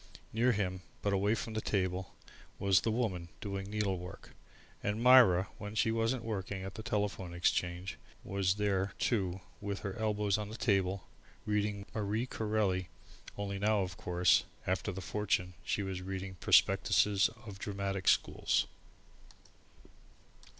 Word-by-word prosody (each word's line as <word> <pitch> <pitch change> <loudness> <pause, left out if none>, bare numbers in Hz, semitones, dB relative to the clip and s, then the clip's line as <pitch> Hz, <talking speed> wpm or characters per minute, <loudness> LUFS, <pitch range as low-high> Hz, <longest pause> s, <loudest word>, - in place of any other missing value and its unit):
Near 120 +3 +3
him, 95 -4 -1 0.2
but 100 - +1
away 100 +3 +2
from 115 - -4
the 110 - -1
table, 95 -3 -1 0.4
was 100 -2 +4
The - - 0
Woman 105 -7 -1
doing 100 -1 -4
needlework, 95 -4 -3 0.5
and 105 +2 -1
Myra, 120 -7 +7
when 105 0 -6
she 110 - +3
wasn't 115 +2 0
working 100 -3 -3
in 95 - -5
the 110 - -7
Telephone 100 -5 -2
Exchange, 90 +1 0 0.3
was 95 -1 +1
there 100 -2 0
too 95 -5 0 0.2
with 100 -1 -3
her 100 - -3
elbows 105 -2 +1
on 105 -1 -4
the 110 - -7
table 95 -4 +1 0.4
reading 105 -1 0
Marie 110 +2 -1
Corelli 105 -7 0 0.5
only 100 -1 -3
now, 105 0 +3
of 90 -2 -3
course, 90 0 +3 0.2
after - - 0
the 95 +1 -6
fortune, 95 -3 -1
she 100 - -1
was 95 -1 -4
reading 95 +1 -4
the 90 - -14
prospectuses 100 -1 +4 0.2
of 100 -3 -8
Dramatic 100 -1 -3
Schools. - - +3
100 Hz, 145 wpm, -33 LUFS, 95-105 Hz, 0.5 s, Myra